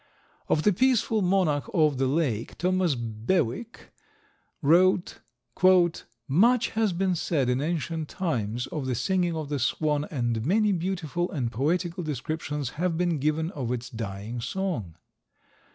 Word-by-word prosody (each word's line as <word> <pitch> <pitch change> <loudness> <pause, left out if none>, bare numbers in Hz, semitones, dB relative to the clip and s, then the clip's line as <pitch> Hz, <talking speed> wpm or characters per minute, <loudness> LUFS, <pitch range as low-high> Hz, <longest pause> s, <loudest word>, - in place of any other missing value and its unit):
Of 155 - +2
the 210 - +4
"Peaceful 230 -1 +2
Monarch 180 -8 +1
of 150 -5 +3
the 135 - +2
Lake," 130 -6 -1
Thomas 180 -3 +1
Bewick 120 - -2 0.7
wrote: 180 +4 +3 1.1
"Much 230 - +4
has 220 -2 +1
been 185 +1 0
said, 150 -6 0
in 125 +2 +1
ancient 160 0 -2
times, 125 - -2
of 140 -2 -4
the 130 - 0
singing 175 +7 0
of 155 -2 -5
the 145 -2 -1
Swan, 150 +3 0
and 120 -7 -2
many 210 - +2
beautiful 175 -2 -2
and 120 -6 -2
poetical 170 - -1
descriptions 150 -2 -3
have 180 -2 +1
been 175 -3 0
given 155 +4 0
of 130 -8 -4
its 125 0 -4
dying 110 +1 -5
song. 150 - -3
155 Hz, 135 wpm, -27 LUFS, 125-180 Hz, 1.1 s, the